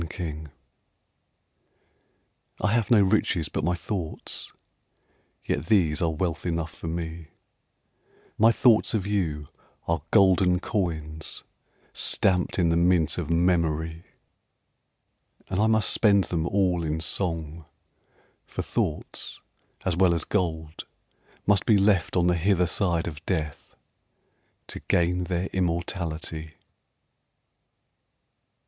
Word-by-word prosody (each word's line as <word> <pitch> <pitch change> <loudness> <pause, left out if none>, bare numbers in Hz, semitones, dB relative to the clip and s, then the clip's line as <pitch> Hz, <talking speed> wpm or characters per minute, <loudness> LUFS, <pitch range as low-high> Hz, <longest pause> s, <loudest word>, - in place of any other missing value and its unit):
Riches 80 -3 -5 2.1
I 105 - +1
have 115 -3 +1
no 110 -4 +6
riches 95 -4 +1
but - - -3
my 90 +2 +1
thoughts, 90 -3 -4 0.9
Yet 75 +3 -2
these 85 -8 +2
are 85 - +2
wealth 80 +1 -2
enough 85 -2 -3
for - - -8
me; 80 -1 -5 1.1
My 115 +2 +5
thoughts 115 -1 +3
of 100 -3 -1
you 80 -8 -2 0.4
are 85 -2 0
golden 95 -3 +4
coins 80 -6 -3 0.5
Stamped 90 -2 +2
in 85 -3 +2
the 85 - +2
mint 85 -2 +2
of - - -4
memory; 85 -1 0 1.5
And 95 - 0
I 110 - +3
must 110 -1 +3
spend 100 -3 +4
them 85 -2 -2
all 90 -3 +1
in 80 0 -2
song, 80 -2 -1 0.8
For - - -4
thoughts, - - -3 0.5
as 90 - 0
well 90 -1 +3
as 85 - -1
gold, 80 -5 -2 0.6
must 100 -2 +2
be 110 - +5
Left 100 -4 +2
on 90 -1 +3
the 90 - +3
hither 90 +1 +2
side 85 -2 0
of 80 -2 -7
death 80 -5 -3 0.9
To - - -4
gain 90 +1 0
their 90 0 -2
immortality. 85 -3 -3
85 Hz, 115 wpm, -26 LUFS, 80-95 Hz, 2.1 s, no